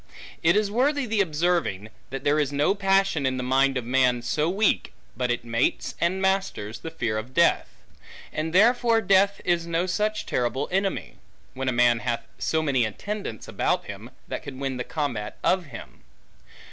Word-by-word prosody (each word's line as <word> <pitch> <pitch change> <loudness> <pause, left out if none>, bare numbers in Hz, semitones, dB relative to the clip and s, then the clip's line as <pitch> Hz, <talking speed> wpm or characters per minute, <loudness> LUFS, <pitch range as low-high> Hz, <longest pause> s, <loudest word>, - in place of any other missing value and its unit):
It 170 +3 +4
is 210 -1 +1
worthy 275 +4 +1
the 220 -2 +1
observing, 160 - 0 0.2
that 135 +1 -6
there 145 +1 +2
is 145 -2 0
no 145 +6 +2
passion 195 -5 +2
in 130 0 -1
the 125 - -3
mind 135 +1 +2
of 125 - -3
man, 125 -1 +2
so 150 +6 0
weak, 200 +3 +1 0.2
but 125 0 -1
it 120 0 -1
mates, 115 +1 0
and 175 +3 +1
masters, 190 - -1
the 165 - -6
fear 115 -8 -2
of 125 +4 -10
death; 170 0 +3 0.6
and 155 +1 -2
therefore, 230 +4 +4
death 195 0 +3
is 170 -1 +1
no 170 +1 0
such 210 +3 -1
terrible 125 +3 -1
enemy, 195 +1 -1 0.4
when 130 0 -2
a - - +1
man 120 -1 +3
hath 120 0 -2 0.2
so 160 0 0
many 135 -5 +2
attendants 115 - -5
about - - 0
him, - - -8 0.2
that - - -4
can 130 - -8
win 135 -1 -3
the 125 - -2
combat 125 -10 -3
of 185 -1 +2
him. 145 - -11
155 Hz, 180 wpm, -25 LUFS, 125-195 Hz, 0.6 s, It